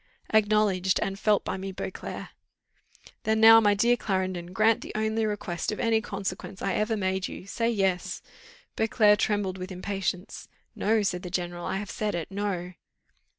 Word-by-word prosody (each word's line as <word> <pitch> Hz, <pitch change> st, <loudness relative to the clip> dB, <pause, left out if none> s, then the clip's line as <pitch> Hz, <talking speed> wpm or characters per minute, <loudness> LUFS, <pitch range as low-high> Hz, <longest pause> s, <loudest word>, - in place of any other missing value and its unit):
"Acknowledged, 205 Hz, -3 st, +3 dB
and 195 Hz, -1 st, -3 dB
felt 210 Hz, -2 st, +2 dB
by -, -, -2 dB
me, 190 Hz, +1 st, -5 dB
Beauclerc." 190 Hz, -, -6 dB, 0.9 s
"Then 220 Hz, 0 st, +1 dB
now, 225 Hz, 0 st, +9 dB
my 205 Hz, -2 st, +3 dB
dear 235 Hz, +4 st, +4 dB
Clarendon, 185 Hz, -5 st, -2 dB
grant 220 Hz, +3 st, +3 dB
the -, -, -7 dB
only 220 Hz, 0 st, 0 dB
request 205 Hz, -4 st, -3 dB
of 210 Hz, -, -5 dB
any 225 Hz, -1 st, +2 dB
consequence 195 Hz, -2 st, -5 dB
I 195 Hz, -, -1 dB
ever 215 Hz, +1 st, 0 dB
made 190 Hz, -1 st, -1 dB
you -, -, -9 dB
say 230 Hz, +3 st, -1 dB
yes." 195 Hz, -5 st, -1 dB, 0.5 s
Beauclerc 215 Hz, -2 st, +4 dB
trembled 200 Hz, -3 st, 0 dB
with 185 Hz, +1 st, -6 dB
impatience. 185 Hz, 0 st, -4 dB, 0.3 s
"No," 215 Hz, 0 st, +2 dB
said 180 Hz, -3 st, -1 dB
the 180 Hz, -, -6 dB
general, 175 Hz, -1 st, -3 dB
"I -, -, -1 dB
have 200 Hz, -1 st, -5 dB
said 210 Hz, -3 st, -2 dB
it 170 Hz, +2 st, -4 dB
No." 195 Hz, -3 st, -3 dB
200 Hz, 165 wpm, -27 LUFS, 185-215 Hz, 0.9 s, now